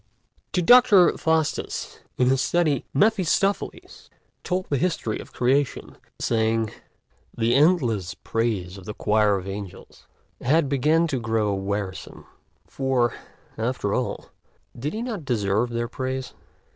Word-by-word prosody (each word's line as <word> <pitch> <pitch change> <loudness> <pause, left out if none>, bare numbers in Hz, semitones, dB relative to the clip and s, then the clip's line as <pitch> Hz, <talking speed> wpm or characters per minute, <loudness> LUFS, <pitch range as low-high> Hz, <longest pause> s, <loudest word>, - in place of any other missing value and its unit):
TO 180 - 0
Dr. 240 -4 +6
Faustus 160 -1 -1 0.2
in 125 0 +3
his 135 0 +2
study 155 -4 +1
Mephistopheles 200 +2 0 0.3
told 185 0 -1
the 140 - 0
history 165 -11 -1
of - - -10
the - - -18
Creation, 135 +2 0 0.2
saying: 110 -1 0 0.7
"The 115 +1 +2
endless 125 - +2
praises 100 -5 -2
of 95 - -14
the 105 - -6
choirs 105 -2 +2
of - - -8
angels 100 -1 -9 0.3
had 145 +4 +2
begun 150 +5 +2
to 140 -6 -2
grow 110 -3 0
wearisome; 95 -1 -4 0.4
for, 130 -3 0 0.5
after 115 -3 -1
all, 125 - -3 0.4
did 140 +6 -4
he 220 +2 -3
not 225 -9 -4
deserve 110 -2 0
their 120 0 -2
praise? 130 +1 -4
125 Hz, 130 wpm, -24 LUFS, 110-160 Hz, 0.7 s, Dr